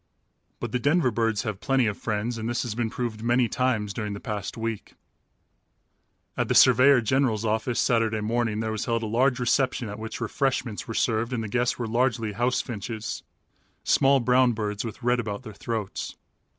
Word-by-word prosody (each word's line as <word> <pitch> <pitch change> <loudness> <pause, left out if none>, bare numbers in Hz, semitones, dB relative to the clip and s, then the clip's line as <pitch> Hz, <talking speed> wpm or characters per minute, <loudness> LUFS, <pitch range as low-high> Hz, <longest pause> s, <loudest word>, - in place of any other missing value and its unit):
But - - -4
the 125 - 0
Denver 145 0 +2
birds 115 -1 0
have 110 -5 -4
plenty 135 0 +2
of 105 -2 0
friends 110 +3 -2
and 110 +1 -3
this 120 - -1
has 120 -4 -3
been 115 0 -1
proved 115 -2 -4
many 120 +1 +2
times 115 -6 0
during 105 -2 -3
the 100 - -6
past 105 0 -5
week. 115 -2 -4 1.4
At - - 0
the - - 0
surveyor 130 +1 +7
general's 115 -2 +1
office 110 +2 0
Saturday 115 -2 +2
morning 110 0 0
there 110 0 -2
was 110 0 -3
held 115 -2 0
a - - -1
large 125 +4 +2
reception 125 -1 +1
at 105 - -7
which 110 0 -6
refreshments 120 -1 -1
were 115 - -5
served 115 +2 0
and 115 -2 -1
the - - -4
guests 125 +3 0
were 120 - -3
largely 115 -1 0
house 120 +4 +1
finches 110 -1 -5 0.6
small, 135 0 +4
brown 125 0 +3
birds 105 -2 -3
with 115 +1 -7
red 125 +1 +2
about 105 +1 -4
their 110 -4 -9
throats. 110 -1 -4
115 Hz, 190 wpm, -26 LUFS, 110-125 Hz, 1.4 s, surveyor